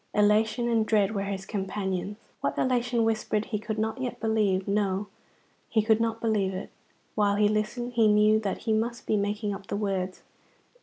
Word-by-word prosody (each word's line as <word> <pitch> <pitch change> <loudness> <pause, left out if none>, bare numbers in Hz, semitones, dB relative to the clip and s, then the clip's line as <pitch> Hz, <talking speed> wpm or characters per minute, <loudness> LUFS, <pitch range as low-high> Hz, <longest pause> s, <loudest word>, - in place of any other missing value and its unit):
Elation 215 +3 +3
and 230 -2 +2
dread 215 -1 +2
were 200 -1 -2
his 195 -1 -4
companions. 195 0 -3 0.2
What - - -2
elation 245 -2 +1
whispered 215 -1 0
he 210 -3 -3
could 220 0 -4
not 220 +4 -2
yet 250 -2 -4
believe; 210 -4 +1
no, 200 0 0 0.6
he 220 -2 +2
could 220 0 +3
not 225 0 0
believe 205 -5 0
it. 185 - -6 0.4
While 205 -1 +2
he 210 0 +4
listened 215 +4 -1
he 230 -2 +4
knew 210 +1 +5
that 205 -3 -3
he 225 - +1
must 235 +2 -1
be - - +1
making 205 +1 -1
up 195 0 -9
the - - -3
words. 190 -3 -2
210 Hz, 185 wpm, -27 LUFS, 200-225 Hz, 0.6 s, knew